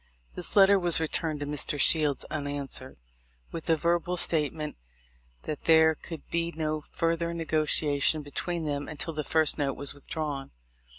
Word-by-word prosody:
This - - -4
letter 200 0 +6
was 175 -3 +4
returned 160 -1 -2
to - - -3
Mr. 145 0 -2
Shields 150 -2 +6
unanswered, 140 -3 -4 0.5
with 165 0 -7
a 165 - +4
verbal 170 +2 -1
statement 150 -2 0 0.7
'that 155 - -7
there 160 -1 +5
could 160 0 -11
be 170 0 -2
no 155 -1 -2
further 170 0 -2
negotiation 155 -2 +1
be 145 - -13
tween 170 0 -3
them 145 -1 -3
until 160 +1 -1
the 150 0 -4
first 160 0 +2
note 140 -2 -2
was 140 0 -1
withdrawn.' 145 -1 -6
155 Hz, 155 wpm, -27 LUFS, 145-165 Hz, 0.7 s, letter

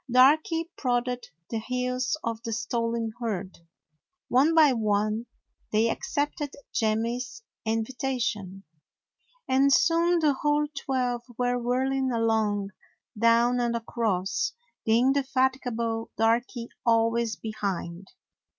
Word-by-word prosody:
Darky 310 +6 +4
prodded 245 -1 -1 0.2
the 225 - -1
heels 250 +3 -1
of 230 -1 -3
the 230 -1 -5
stolen 230 0 -1
herd. 200 -6 -3 0.7
One 285 +6 +4
by 305 -4 +6
one 215 0 0 0.4
they 225 +2 +3
accepted 290 0 -2 0.2
Jemmy's 235 - -1 0.2
invitation, 225 -4 -2 0.8
and 270 +1 +4
soon 335 +4 +4
the 305 -3 +3
whole 295 +2 +1
twelve 255 -3 -1 0.2
were 245 0 +1
whirling 260 +2 0
along, 220 -3 +1 0.4
down 230 +2 +3
and 240 -1 0
across, 220 -5 -1 0.3
the 220 - +4
indefat 265 +1 +2
igable 230 -2 -2
Darky 230 +1 +1
always 230 -1 +2
behind. 195 -4 -4
240 Hz, 105 wpm, -27 LUFS, 225-260 Hz, 0.8 s, by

